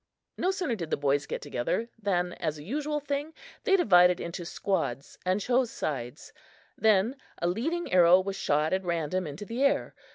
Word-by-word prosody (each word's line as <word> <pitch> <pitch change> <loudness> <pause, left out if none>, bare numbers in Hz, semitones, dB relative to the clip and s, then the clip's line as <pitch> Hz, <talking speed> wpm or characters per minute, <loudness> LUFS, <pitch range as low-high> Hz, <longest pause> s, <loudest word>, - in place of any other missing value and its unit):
No 365 - 0
sooner 365 -9 -1
did 170 -6 -5
the - - 0
boys 145 0 +1
get - - -4
together 125 - -2
than, 180 -3 0
as 155 -2 -3
a 145 - -9
usual 295 - -2
thing, 290 +2 -4 0.3
they 390 - +5
divided 180 - +5
into 170 +1 -5
squads 165 -8 -3
and 185 +2 +2
chose 245 +3 +1
sides; 125 - -5 0.4
then 220 +4 +3 0.2
a 170 - 0
leading 295 - -2
arrow 180 0 +7
was 195 +1 -3
shot 150 -2 +1
at 190 0 0
random 170 0 -1
into 150 +8 -7
the 235 +5 -4
air. 280 - +2
185 Hz, 175 wpm, -28 LUFS, 165-250 Hz, 0.4 s, arrow